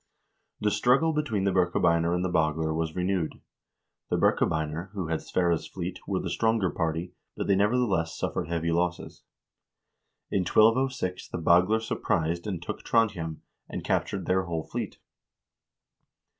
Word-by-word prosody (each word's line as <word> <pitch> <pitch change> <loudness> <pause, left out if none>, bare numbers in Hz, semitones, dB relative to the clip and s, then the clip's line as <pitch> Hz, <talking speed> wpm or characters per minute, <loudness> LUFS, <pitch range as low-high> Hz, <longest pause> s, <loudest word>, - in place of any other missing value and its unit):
1 - - -7
The - - +3
struggle 125 +10 +3
between 135 -10 -1
the 100 - +2
Birkebeiner 85 -2 +2
and 90 +1 0
the 90 - -1
Bagler 80 -1 +1
was 80 -1 -2
renewed. 90 -2 -1 0.7
The - - +1
Birkebeiner, 80 +3 +1
who 95 -5 -3
had 80 - 0
Sverre's 85 -2 0
fleet, 90 0 -5
were 95 -2 0
the 90 - -4
stronger 110 +1 +1
party, 80 +1 -2 0.2
but - - -2
they 100 - +3
nevertheless 100 -5 +1
suffered - - -2
heavy 85 0 -1
losses. 90 +1 -2 1.1
In 100 - +2
1206 110 0 +2
the - - -5
Bagler 90 +6 +4
surprised 85 -4 -1
and 95 -5 -2
took - - -5
Trondhjem, 95 -9 0 0.3
and - - -5
captured 95 -3 -1
their 95 +1 +1
whole 85 -2 -3
fleet. - - -5
90 Hz, 145 wpm, -27 LUFS, 85-105 Hz, 1.1 s, Bagler